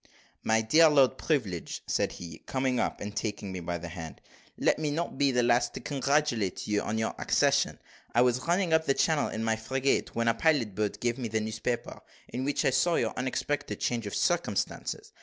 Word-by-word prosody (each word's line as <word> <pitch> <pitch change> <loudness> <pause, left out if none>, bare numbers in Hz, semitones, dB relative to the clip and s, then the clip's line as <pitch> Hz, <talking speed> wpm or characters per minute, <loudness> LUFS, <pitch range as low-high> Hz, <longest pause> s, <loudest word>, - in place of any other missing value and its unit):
"My 110 0 +2
dear 155 +9 +6
Lord 135 -3 +4
Privilege," 105 - -2
said - - 0
he, 85 -2 -9
coming 130 -2 0
up - - -1
and 105 0 -5
taking 105 -3 -3
me 95 - -4
by 85 0 -3
the 85 0 -7
hand, 80 -2 -8 0.4
"let - - +2
me 155 -1 -1
not 160 -1 -3
be 140 -1 +4
the 125 -1 +2
last 120 +1 +2
to - - -4
congratulate 140 -8 0
you 105 -1 +1
upon 110 - -2
your 110 0 -1
accession. - - +2 0.4
I 120 - +6
was 125 0 +2
running 175 -1 +2
up 160 0 +3
the 135 - +3
channel 155 -3 +2
in 110 - -3
my 110 0 +1
frigate, 130 +4 0
when 115 0 0
a 115 - +5
pilot 120 -4 +2
boat 105 +1 -2
gave 120 +1 0
me 120 - -2
the 110 0 -1
newspaper, 110 +3 -3 0.3
in 125 +2 -3
which 145 +2 0
I 135 - +4
saw 170 +6 +2
your - - 0
unexpected 130 +3 -2
change 115 -3 -1
of 100 - -4
circumstances. - - -1
120 Hz, 205 wpm, -29 LUFS, 110-140 Hz, 0.4 s, dear